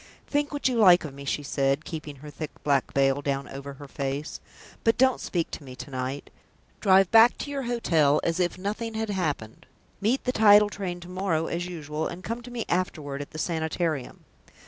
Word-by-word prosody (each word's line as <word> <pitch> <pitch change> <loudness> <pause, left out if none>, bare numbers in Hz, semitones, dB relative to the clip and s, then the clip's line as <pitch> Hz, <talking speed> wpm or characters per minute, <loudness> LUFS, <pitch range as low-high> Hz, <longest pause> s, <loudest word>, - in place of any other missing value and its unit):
"Think 290 0 0
what 290 -3 0
you 250 -2 0
like 180 -5 +7
of 145 - -7
me," 140 0 -9
she 145 - -1
said, 140 +1 0
keeping 155 -3 -6
her 150 +2 -11
thick 150 +1 -5
black 140 -3 +1
veil 135 0 +2
down 140 -1 -2
over 140 +1 -7
her 140 +1 -11
face, 140 +2 -4 0.4
"but 225 - +3
don't 260 -1 +3
speak 170 -3 -2
to - - -7
me 130 -2 -10
to 135 +3 -9
night. 130 +2 -4 0.5
Drive 190 -2 +5
back 230 +2 +7
to 285 - -5
your 280 -1 -2
hotel 165 - +2
as 165 +2 0
if 175 0 0
nothing 215 +4 -4
had 220 -1 -2
happened. 150 - -3 0.3
Meet 230 +7 +1
the 250 - 0
tidal 210 -3 +6
train 180 -3 -4
to 175 - -10
morrow 180 -3 -1
as 175 +1 -3
usual, 155 -3 -4
and 180 +2 -8
come 230 +5 -4
to 245 - -10
me 240 -2 -4
afterward 150 -6 -2
at 145 - -7
the 155 - -9
Sanitarium. 160 -3 -2
165 Hz, 205 wpm, -26 LUFS, 145-205 Hz, 0.5 s, like